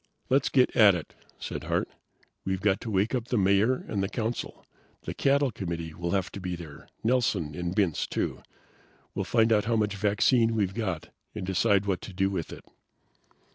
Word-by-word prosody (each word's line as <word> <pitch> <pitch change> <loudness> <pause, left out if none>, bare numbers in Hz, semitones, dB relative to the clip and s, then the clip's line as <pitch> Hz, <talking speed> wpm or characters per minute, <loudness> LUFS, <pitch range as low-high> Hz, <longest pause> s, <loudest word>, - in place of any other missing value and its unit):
"Let's 135 +1 +3
get 130 -2 +3
at 105 -5 +7
it," 85 - -6 0.2
said - - -6
Hart. - - 0 0.6
"We've 95 0 -1
got 95 0 +1
to - - -5
wake 100 +3 +1
up 120 -2 -1
the 120 - 0
Mayor 100 +6 +2
and 100 - -2
the 95 - -1
Council. 115 +1 -4 0.4
The - - -4
cattle 140 -1 +2
committee 85 -5 -5
will 85 +2 -4
have 95 0 0
to 100 - -7
be 90 -1 -3
there. 80 -4 -11
Nelson 110 -10 +1
and 90 +3 -3
Bintz, 95 -7 +1
too. - - -2 0.7
We'll - - -2
find 115 -1 +3
out 105 -1 +2
how 115 0 +1
much 105 -2 0
vaccine 110 +3 +3
we've 100 -3 0
got 95 -8 -3 0.3
and - - -4
decide 95 +1 +2
what 95 -3 -1
to 100 - -9
do 95 +1 +1
with 85 -5 -3
it." - - -10
100 Hz, 190 wpm, -28 LUFS, 90-115 Hz, 0.7 s, at